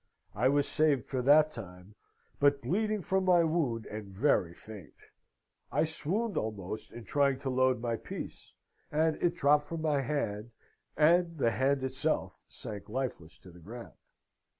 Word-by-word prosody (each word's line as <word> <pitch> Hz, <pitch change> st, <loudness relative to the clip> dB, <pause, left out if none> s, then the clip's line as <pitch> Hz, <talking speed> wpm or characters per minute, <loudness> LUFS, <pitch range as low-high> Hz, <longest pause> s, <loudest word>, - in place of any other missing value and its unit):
I 120 Hz, +6 st, +2 dB
was 145 Hz, 0 st, +2 dB
saved 150 Hz, -5 st, +2 dB
for 130 Hz, -2 st, -2 dB
that 150 Hz, +4 st, +5 dB
time, 95 Hz, -5 st, -10 dB, 0.5 s
but 140 Hz, 0 st, +3 dB
bleeding 215 Hz, +1 st, 0 dB
from 190 Hz, +2 st, +1 dB
my 180 Hz, -2 st, +5 dB
wound 150 Hz, -9 st, 0 dB
and 105 Hz, -1 st, -7 dB
very 100 Hz, -, +2 dB
faint. 105 Hz, -7 st, -12 dB, 0.8 s
I -, -, +2 dB
swooned 185 Hz, +8 st, -2 dB
almost 105 Hz, -1 st, -4 dB
in 120 Hz, -, -9 dB
trying 140 Hz, +3 st, +2 dB
to 135 Hz, -2 st, -2 dB
load 130 Hz, -1 st, +2 dB
my 115 Hz, -1 st, -2 dB
piece, -, -, -8 dB, 0.4 s
and 155 Hz, +1 st, +2 dB
it 175 Hz, 0 st, +2 dB
dropped 145 Hz, -1 st, +3 dB
from 160 Hz, +1 st, -5 dB
my 150 Hz, -3 st, +2 dB
hand, 120 Hz, -6 st, -3 dB, 0.4 s
and 170 Hz, +2 st, +4 dB
the 115 Hz, -5 st, +2 dB
hand 135 Hz, +3 st, +1 dB
itself 130 Hz, -, -1 dB
sank 105 Hz, -2 st, -8 dB
lifeless 105 Hz, -, -4 dB
to 90 Hz, -, -15 dB
the 90 Hz, -, -15 dB
ground. 115 Hz, +8 st, -10 dB
135 Hz, 155 wpm, -31 LUFS, 110-155 Hz, 0.8 s, that